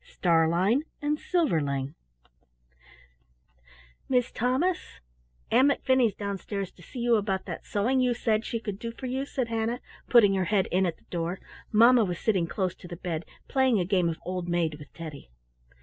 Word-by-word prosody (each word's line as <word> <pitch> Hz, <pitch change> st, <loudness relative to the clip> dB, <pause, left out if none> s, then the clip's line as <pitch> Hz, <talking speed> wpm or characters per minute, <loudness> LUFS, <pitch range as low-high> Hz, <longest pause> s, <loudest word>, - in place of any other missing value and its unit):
STARLEIN 175 Hz, -, +2 dB, 0.2 s
AND 295 Hz, +1 st, -1 dB
SILVERLING 145 Hz, -, 0 dB, 2.2 s
Mis' 250 Hz, -1 st, +2 dB
Thomas, 260 Hz, +10 st, -1 dB, 0.5 s
Ann 265 Hz, -, +6 dB
McFinney's 260 Hz, -6 st, +2 dB
downstairs 200 Hz, -1 st, -4 dB
to -, -, -19 dB
see 250 Hz, -, -12 dB
you 240 Hz, -1 st, +3 dB
about 195 Hz, -2 st, -1 dB
that -, -, -7 dB
sewing 235 Hz, +6 st, +1 dB
you 250 Hz, -1 st, +2 dB
said 220 Hz, -2 st, +1 dB
she 230 Hz, -, -3 dB
could 205 Hz, -3 st, -5 dB
do 230 Hz, 0 st, -4 dB
for 260 Hz, -, -9 dB
you," 265 Hz, +2 st, -2 dB
said 255 Hz, -5 st, -2 dB
Hannah, 230 Hz, +1 st, -1 dB, 0.3 s
putting 215 Hz, -5 st, +6 dB
her 190 Hz, -1 st, +1 dB
head 200 Hz, 0 st, +2 dB
in 185 Hz, +1 st, +3 dB
at 165 Hz, -, -3 dB
the -, -, -29 dB
door. 170 Hz, +1 st, -2 dB, 0.3 s
Mamma 235 Hz, +2 st, +6 dB
was 180 Hz, -4 st, -2 dB
sitting 190 Hz, -6 st, +1 dB
close 185 Hz, 0 st, -1 dB
to 180 Hz, -, -11 dB
the 175 Hz, -, -7 dB
bed 170 Hz, -2 st, -4 dB, 0.2 s
playing 260 Hz, -5 st, +3 dB
a 180 Hz, -, 0 dB
game 180 Hz, -2 st, +2 dB
of 160 Hz, -, -3 dB
Old 180 Hz, -1 st, -3 dB
Maid 165 Hz, -3 st, 0 dB
with 145 Hz, -, -12 dB
Teddy. 155 Hz, -, -8 dB
205 Hz, 170 wpm, -27 LUFS, 175-245 Hz, 2.2 s, Ann